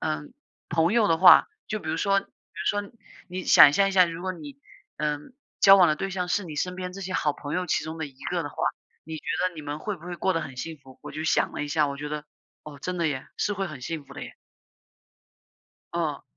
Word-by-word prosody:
嗯， 155 -2 -3 0.3
朋 165 +3 +2
友 230 -2 +4
的 165 - +4
话， 185 - +9 0.2
就 215 - -2
比 180 - -8
如 160 - -1
说 195 -1 +3
比 - - -15
如 205 - -3
说 205 - -10 0.4
你 185 0 -5
想 145 - +9
象 195 +4 +3
一 - - -3
下， 185 -1 +7
如 165 0 -6
果 185 - -2
你， 145 -5 -10 0.4
呃， 150 0 -1 0.4
交 195 0 +9
往 180 -3 +7
的 155 - +3
对 195 0 -3
象 180 -1 -2
是 200 +3 +1
你 155 -4 -8
身 180 +4 -1
边 180 -1 -5
这 195 - -8
些 185 0 -5
好 150 - +1
朋 145 +1 -6
友 180 0 -1
其 - - 0
中 160 +1 -6
的 160 - -3
一 135 -1 -15
个 175 -1 -1
的 145 - -5
话， - - -15 0.5
你 160 +1 -6
觉 - - -10 0.3
得 180 - -16
你 155 - -8
们 145 0 -5
会 205 +4 -4
不 170 - -16
会 175 -1 -5
过 190 - +1
得 165 - 0
很 130 -4 -8
幸 160 +5 -5
福？” 130 -1 -16
我 - - -8
就 155 - -4
想 - - +2
了 - - -3
一 - - -6
下， 150 0 +2
我 140 - -4
觉 145 +1 -5
得， 150 0 -4 0.4
哦， 150 -2 -10
真 180 +3 -3
的 170 - +1
耶， 140 -4 -3
是 210 - 0
会 195 -1 -2
很 150 -5 -9
幸 155 +3 -5
福 140 - -14
的 - - -7
耶。 - - -9 1.6
哦。 160 -4 -2
165 Hz, 280 characters per minute, -26 LUFS, 150-185 Hz, 1.6 s, 话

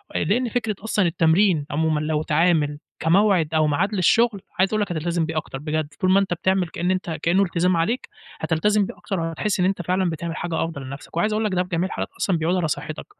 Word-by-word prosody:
لأن 235 +9 +1
فكرة 220 -2 -1
أصلًا 210 -3 +1
التمرين 165 0 +3
عمومًا 155 0 +1
لو 155 0 -1
اتعامل 155 -2 +2 0.2
كموعد 175 -2 +3
أو 155 -1 +3
معاد 180 +9 0
للشغل 205 +3 +3 0.2
عايز 190 - +4
أقول 215 - +1
لك 200 - -2
هتلتزِم 170 0 -1
بيه 160 0 -4
أكتَر 140 -3 -4
بجد. 155 0 -2
كلّ 185 0 +1
ما 195 - +6
أنت 190 -3 0
بتعمل، 185 +1 +1
كأن 175 +2 -2
أنت 185 -2 -2
كأنه 185 +4 +3
إلتزام 175 0 +1
عليك، 215 +10 -1 0.3
هتلتزم 205 +5 +1
بيه - - -9
أكتر 195 -4 -4
و - - -1
هتحس 185 +5 -2
إن 180 - +3
أنت 190 -1 0
فعلا 185 +1 0
بتعمل 165 +1 -4
حاجة 170 -3 -2
أفضَل 165 -4 -5
لنَفسك 140 +4 -9
وعايز 210 +5 +1
أقول 215 0 0
لك 205 - -1
ده 180 - +2
في 180 - -13
جميع 175 +1 0
الحالات - - -4
أصلا 180 -4 +1
بيعود 165 +3 0
على 175 -3 0
صحّتك 150 +1 -4
175 Hz, 225 wpm, -23 LUFS, 160-195 Hz, 0.3 s, ما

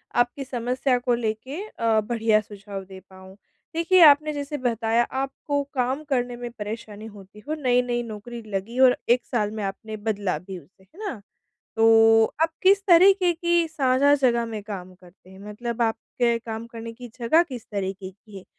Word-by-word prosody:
आपकी 245 +3 +1
समस्या 250 0 -1
को 245 0 0
लेके 235 - -3
अ, 225 - +1
बढ़िया 220 -1 +1
सुझाव 200 -1 -9
दे 190 0 -11
पाऊँ। 190 0 -14 0.4
देखिए 340 +2 +4
आपने 305 +1 +5
जैसे 290 +1 -4
बताया 235 -2 +1 0.2
आपको 285 +1 -3
काम 260 +3 -1
करने 245 -2 -1
में 240 0 -6
परेशानी 215 -1 -7
होती 205 -1 -13
हो 310 - -2
नई-नई 245 -2 +1
नौकरी 230 +2 -8
लगी 210 +6 -4
और 255 -1 +6
1 245 +1 +3
साल 210 -4 -1
में 215 -1 -5
आपने 215 +3 -5
बदला 205 -5 -2
भी 185 +2 -9
उसे 190 +2 -23
है 200 - -21
ना? 235 - -6 0.6
तो 225 0 +6 0.2
आप 325 - +2
किस 390 +1 +5
तरीक़े 370 0 +6
की 340 0 +1
साझा 280 -2 +3
जगह 240 -4 +1
में 220 -2 -6
काम 185 -3 -8
करते 180 0 -20
हैं? 190 - -14
मतलब 235 +2 -4
आपके 235 +1 0
काम 225 -1 -7
करने 230 0 -8
की 245 +1 -11
जगह 250 +8 +4
किस 245 -4 -8
तरीक़े 190 -1 -4
की 200 +1 -14
है 190 - -14
235 Hz, 175 wpm, -24 LUFS, 210-260 Hz, 0.6 s, और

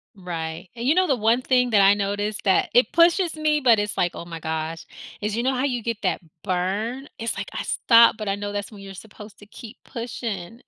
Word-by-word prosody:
Right. 170 -2 -6
And 235 +2 -4
you 310 - +4
know, 370 0 +4
the 270 - +2
one 230 +2 +2
thing 250 -1 +2
that 205 -2 +5
I 195 +1 +6
noticed 205 +1 -2
that 190 -2 +2
it 245 - +4
pushes 340 0 +3
me, 305 -1 +1
but 235 -4 +5
it's 205 0 -3
like, 175 - +1
"Oh 170 - -7
my 165 -1 -8
gosh," 160 +1 -4 0.4
is, 210 +1 -2
you 235 - -1
know 265 +1 +1
how 255 +1 -1
you 245 -5 -1
get 230 -2 -2
that - - -1 0.2
burn? 205 +9 -2
It's 230 0 -3
like, - - -5
I - - -3
stop 230 -1 +5
but 215 -2 -6
I 195 - 0
know 205 0 -5
that's 205 +1 -5
when 205 -2 -12
you're 195 0 -9
supposed 210 +1 -12
to 205 - -14
keep 225 +3 -12
pushing. 230 -3 -6
215 Hz, 235 wpm, -23 LUFS, 195-245 Hz, 0.4 s, I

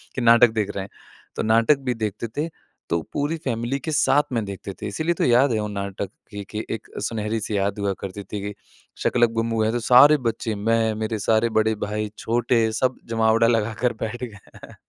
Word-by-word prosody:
कि 125 - -2
नाटक 120 0 +6
देख 105 -2 -1
रहे 95 - -2
हैं। 95 - -10 0.5
तो - - -2
नाटक 115 +6 +4
भी - - +2
देखते 110 0 -3
थे 155 +3 -1 0.4
तो 85 0 +1
पूरी 145 +3 -1
फैमिली 120 +2 -1
के 160 - -4
साथ 145 -1 +3
में 115 -2 0
देखते 100 0 -7
थे 105 - -3
इसीलिए 160 +11 -1
तो - - -1
याद 125 +3 +4
है 110 - +1
वो 105 - -2
नाटक 100 -1 -4 0.2
कि 105 -1 -6
कि 110 +1 -4
एक 115 - -5 0.2
सुनहरी 110 0 -2
से 105 - -3
याद 100 +1 0
हुआ 100 -1 0
करती 100 +1 -6
थी 100 +1 -6
कि 100 +1 -5 0.5
शाका - - +1
लाका 120 -1 +4
बूम 115 0 -1
बूम 110 -1 +1
है 110 - +1
तो 120 - 0
सारे 130 +6 +7
बच्चे 115 0 -2
मैं 110 +2 +1
मेरे 110 0 -3
सारे 110 +3 +2
बड़े 110 0 +3
भाई, 105 0 -3
छोटे 115 -1 +1
सब 130 +3 0
जमावड़ा 115 0 +3
लगा 115 -1 +1
कर 125 -1 +2
बैठ 120 +3 -4
गए 110 -5 -7 0.3
हैं - - -15
110 Hz, 220 wpm, -23 LUFS, 105-120 Hz, 0.5 s, सारे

